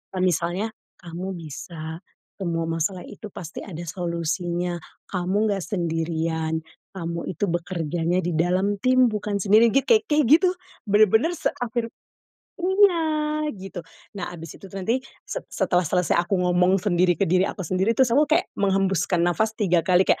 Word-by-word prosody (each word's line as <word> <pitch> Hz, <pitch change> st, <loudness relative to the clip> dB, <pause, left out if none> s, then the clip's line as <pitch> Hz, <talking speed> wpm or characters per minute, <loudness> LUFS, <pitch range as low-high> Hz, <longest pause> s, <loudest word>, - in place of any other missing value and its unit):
kayak 185 Hz, -, 0 dB
misalnya, 180 Hz, +5 st, 0 dB, 0.3 s
"Kamu 180 Hz, +3 st, -5 dB
bisa, 160 Hz, 0 st, -7 dB, 0.4 s
semua 170 Hz, -3 st, -1 dB
masalah 165 Hz, +3 st, -2 dB
itu 215 Hz, 0 st, -9 dB
pasti 170 Hz, -1 st, -8 dB
ada 170 Hz, -3 st, -7 dB
solusinya, 175 Hz, 0 st, -2 dB, 0.3 s
kamu 190 Hz, +4 st, 0 dB
nggak 195 Hz, -, -1 dB
sendirian, 160 Hz, -2 st, -1 dB, 0.3 s
kamu 170 Hz, -1 st, -4 dB
itu 195 Hz, +4 st, -1 dB
bekerjanya 175 Hz, 0 st, -1 dB
di 175 Hz, -, -1 dB
dalam 185 Hz, +4 st, +1 dB
tim 255 Hz, 0 st, +5 dB
bukan 210 Hz, -1 st, -2 dB
sendiri," 215 Hz, +4 st, +5 dB
git 275 Hz, -, +3 dB
ka 455 Hz, -2 st, +6 dB
kayak 300 Hz, -1 st, +3 dB
gitu. 365 Hz, 0 st, +3 dB, 0.4 s
Bener-bener 220 Hz, -, +4 dB
seafir 240 Hz, -3 st, -2 dB, 0.7 s
iya, 320 Hz, -5 st, +2 dB
gitu. 190 Hz, -1 st, -7 dB, 0.4 s
Nah -, -, -4 dB
abis 165 Hz, -1 st, -9 dB
itu 195 Hz, -, -11 dB
nanti 225 Hz, +7 st, 0 dB, 0.2 s
se -, -, -4 dB
setelah 180 Hz, -1 st, +1 dB
selesai 180 Hz, +1 st, +1 dB
aku 185 Hz, +3 st, 0 dB
ngomong 180 Hz, +1 st, +3 dB
sendiri 180 Hz, -2 st, +2 dB
ke 195 Hz, -, +3 dB
diri 185 Hz, +3 st, +3 dB
aku 190 Hz, -, -5 dB
sendiri, 190 Hz, +6 st, +1 dB
terus 255 Hz, -3 st, +3 dB
aku 300 Hz, +2 st, +5 dB
kayak 310 Hz, -, +3 dB
menghembuskan 195 Hz, -3 st, +1 dB
nafas 175 Hz, +6 st, +1 dB
3 180 Hz, -5 st, +3 dB
kali 180 Hz, +1 st, +5 dB
kayak, -, -, +3 dB
185 Hz, 150 wpm, -24 LUFS, 170-215 Hz, 0.7 s, ka